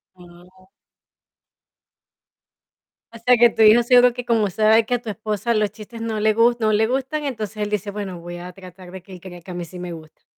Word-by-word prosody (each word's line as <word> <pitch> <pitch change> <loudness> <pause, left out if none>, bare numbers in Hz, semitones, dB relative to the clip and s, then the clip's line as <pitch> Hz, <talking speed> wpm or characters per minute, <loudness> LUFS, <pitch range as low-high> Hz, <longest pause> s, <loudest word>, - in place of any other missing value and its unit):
Guau. 180 +1 -19 2.5
O - - -10
sea, 245 +2 +3
que 240 0 +5
tu - - -7
hijo, 220 +2 +7
seguro 245 0 +4
que 245 0 -6
como 225 -3 +1
sabe 220 +3 +3
que 245 - -1
a - - +1
tu 225 - -6
esposa 215 +2 -3
los 215 -2 0
chistes 215 +3 -12
no 225 -1 -3
le 215 +1 +2
gus 235 +2 +2
no 215 -1 +1
le 215 +1 +2
gustan, 265 +5 -3
entonces 220 -5 -5
él 210 -1 -2
dice: 210 -1 -3
"Bueno, 195 -4 -6
voy 175 +1 -8
a 175 +1 -9
tratar 185 -1 -13
de 190 0 -10
que 190 - -16
él 180 - -11
crea 175 -1 -11
que 185 - -12
a - - -6
mí 175 -1 -6
sí 180 +2 -11
me 175 -1 -6
gusta". 155 -2 -13
215 Hz, 225 wpm, -21 LUFS, 185-230 Hz, 2.5 s, hijo